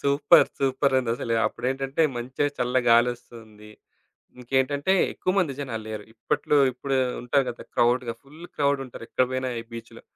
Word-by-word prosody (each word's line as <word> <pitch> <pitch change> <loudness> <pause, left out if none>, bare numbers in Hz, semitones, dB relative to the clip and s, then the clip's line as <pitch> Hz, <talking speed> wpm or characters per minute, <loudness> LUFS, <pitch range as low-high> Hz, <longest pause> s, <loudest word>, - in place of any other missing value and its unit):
Super! 140 +1 +4
సూపరుందసలు. 130 -4 0
అప్పుడేంటంటే 135 +4 -2
మంచిగా 130 +4 -2
చల్ల 125 +1 0
గాలోస్తుంది. 115 -3 0 0.7
ఇంకేంటంటే 135 +7 0 0.2
ఎక్కువ 185 - -1
మంది 160 -7 +1
జనాలు 115 -5 -5
లేరు. 110 -1 -6
ఇప్పట్లో 115 +5 0 0.2
ఇప్పుడు 135 +2 -2 0.3
ఉంటారు 135 +3 +2
కదా! 120 - -10
క్రౌడ్‌గా, 120 0 +2
ఫుల్ 150 +5 -14
క్రౌడుంటారు. 140 -5 -1
ఎక్కడ 130 - +2
పోయినా 130 0 -2
ఈ - - -8
బీచులో. 115 0 -10
130 Hz, 130 wpm, -25 LUFS, 120-140 Hz, 0.7 s, Super